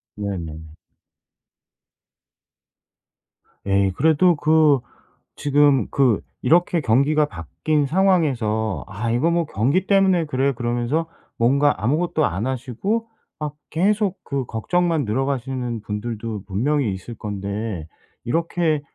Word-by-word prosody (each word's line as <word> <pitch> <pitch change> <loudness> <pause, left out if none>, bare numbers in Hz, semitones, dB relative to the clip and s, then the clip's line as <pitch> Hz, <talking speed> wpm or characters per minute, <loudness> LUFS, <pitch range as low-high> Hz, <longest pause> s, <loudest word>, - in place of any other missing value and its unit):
네네. 80 -6 -5 2.9
에이 100 -1 +2
그래도 160 +3 +4
그 155 -2 +4 0.6
지금 145 -4 +3
그 130 -6 +3 0.2
이렇게 170 +3 +3
경기가 145 +6 +3
바뀐 145 - -2
상황에서 135 - +1
'아 110 +3 -3
이거 130 +8 +2
뭐 170 -1 +1
경기 140 - 0
때문에 190 -4 +3
그래.' 140 -1 0
그러면서 120 +6 -1 0.3
뭔가 140 +5 +3
아무것도 155 +4 +1
안 100 +8 -2
하시고 135 - -2 0.3
막 150 -1 -4
계속 200 +3 +1
그 135 -3 -3
걱정만 165 +6 0
늘어가시는 125 -1 -2
분들도 110 -1 -5
분명히 115 +3 0
있을 95 +5 -8
건데 100 -4 -4 0.4
이렇게 165 +2 0
135 Hz, 230 characters per minute, -22 LUFS, 110-160 Hz, 2.9 s, 그래도